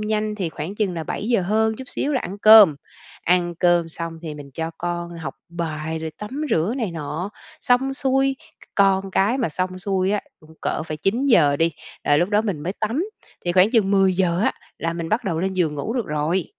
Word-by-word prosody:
nhanh 215 0 -1
thì 190 -5 -2
khoảng 160 +5 -6
chừng 205 -4 -1
là 165 -2 -4
7:00 220 +3 0
hơn 220 +4 +1
chút 260 +1 -9
xíu 295 - -2
là 260 - +1
ăn 195 +3 -6
cơm. 210 -7 +8 0.5
Ăn 175 0 +2
cơm 175 -1 +2
xong 165 0 -5
thì 155 -3 -5
mình 145 -2 -10
cho 160 0 -3
con 175 0 -3
học 160 - -5
bài 160 -2 -4
rồi 160 0 -4
tắm 210 +2 -7 0.2
rửa 175 +10 +1
này 225 -8 -2
nọ. 165 +4 -4 0.3
Xong 265 +2 +2
xuôi 270 0 +1 0.3
c - - -34
con 195 -1 +3
cái 205 +7 +2
mà 245 - +1
xong 185 +3 -3
xuôi 190 0 0
á, 205 0 +1 0.2
cũng 155 +1 -17
cỡ - - -1
phải 155 -1 -5
9:00 195 - +3
đi 165 +2 +2 0.3
là 145 - +4
lúc 175 +4 +2
đó 210 0 +3
mình 200 -9 -2
mới 180 - -2
tắm, 230 - 0 0.4
thì 175 - 0
khoảng 185 +3 +5
chừng 220 -5 +3
10:00 190 -2 +3
á - - +2 0.3
là 165 0 -1
mình 170 -1 -4
bắt 225 +4 0
đầu 165 -4 -1
lên 190 +1 -1
giường 170 -5 0
ngủ 145 +10 -3
được 245 -5 -1
rồi. 155 +4 0
185 Hz, 215 wpm, -22 LUFS, 165-215 Hz, 0.5 s, cơm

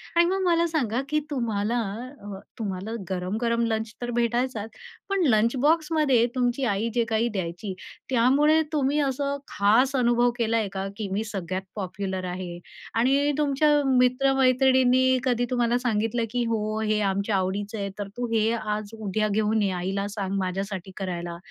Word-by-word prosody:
आणि 340 0 +6
मग 380 +2 0
मला 340 -1 +3
सांगा 260 -7 0
की 305 0 +2
तुम्हाला 230 -2 -1 0.4
अ, 200 -2 -7 0.2
तुम्हाला 200 0 -4 0.2
गरम-गरम 220 +6 -1
लंच 220 0 -2
तर 240 0 -3
भेटायचाच, 235 -1 -1 0.4
पण 395 -2 +1
लंच 225 +3 +3
बॉक्समध्ये 300 -5 +3
तुमची 250 +1 0
आई 210 +1 0
जे 240 -1 +2
काही 225 +2 +1
द्यायची, 185 0 -4 0.4
त्यामुळे 280 +6 +4
तुम्ही 290 0 +1
असं 280 0 -1
खास 235 +7 +3
अनुभव 240 -1 +3
केलाय 225 -2 +1
का? 195 0 -3
की 210 -2 -3
मी 210 +3 -1
सगळ्यात 190 -3 -4
पॉप्युलर 190 -1 -4
आहे 180 -1 -5 0.4
आणि 275 +5 +3
तुमच्या 295 0 +2 0.2
मित्र-मैत्रिणींनी 260 0 +4
कधी 245 -2 +1
तुम्हाला 240 -1 +1
सांगितलं 230 -1 0
की 245 -1 0
"हो, 215 -1 -1
हे 215 -1 +1
आमच्या 200 +1 0
आवडीचं 200 +3 -2
आहे 200 -1 -3
तर 200 - -3
तू 245 0 -2
हे 220 0 +2
आज-उद्या 215 -1 -2
घेऊन 215 +1 +1
ये, 195 -2 +1
आईला 190 +3 -2
सांग 200 -2 -3
माझ्यासाठी 190 0 -3
करायला" 175 -3 -4
225 Hz, 150 wpm, -25 LUFS, 200-255 Hz, 0.4 s, आणि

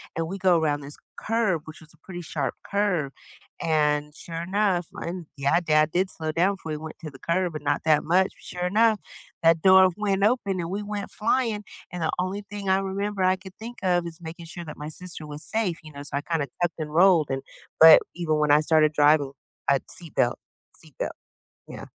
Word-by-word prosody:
and 165 0 -2
we 195 +3 -5
go 180 -3 +3
around 145 -2 0
this 140 +1 -8 0.2
curve, 215 -8 0
which 160 - -10
was 155 - -16
a - - -24
pretty 175 -2 -7
sharp 155 -3 -3
curve, 195 -9 0 0.5
and, 150 -2 +1
sure 165 -2 -6
enough 190 -2 0
and, 170 -2 -6
yeah, 140 +5 +2
dad 155 -1 +3
did 185 +2 +1
slow 155 -1 -4
down 185 +5 +2
before 160 -4 -8
he - - -3
went 155 +1 -7
into 155 - -6
the 135 - -13
curve, 175 0 0
but 155 - -5
not 145 0 0
that 155 -1 +4
much. 185 +4 +2
Sure 180 0 -5
enough, 220 +2 +3 0.4
that 165 0 +5
door 190 0 +7
went 200 -2 0
open 200 -5 +1
and 170 0 -3
we 200 +2 -3
went 205 -1 -5
flying. 220 -1 0 0.3
And 175 -2 -4
the 160 - +1
only 190 +3 -2
thing 200 -1 -6
I 190 +1 +4
remember 195 0 -2
I 185 0 +3
could 190 0 -12
think 235 +2 -8
of 175 -2 +2
is 165 +1 -10
making 165 0 -9
sure 175 0 -8
that 155 - -8
my 150 +1 -6
sister 170 -1 -8
was 150 +1 -7
safe, 210 -7 -1
you 155 - -11
know, 140 0 -8
so 140 -1 -3
I - - -1
kinda 155 -2 -2
tucked 175 -1 +1
and 150 -1 -5
rolled 170 -4 +5
and 135 0 -2 0.4
but 160 0 +10 0.2
even 165 -3 0
when 150 -1 +3
I 150 - +7
started 155 -1 +3
driving, 145 -1 +4 0.4
I - - +6
had 135 - -2
seat 170 -3 -7
belt 120 - +2 0.4
seat - - -16
belt, - - -2 0.5
yeah. - - -9
170 Hz, 220 wpm, -25 LUFS, 155-190 Hz, 0.5 s, but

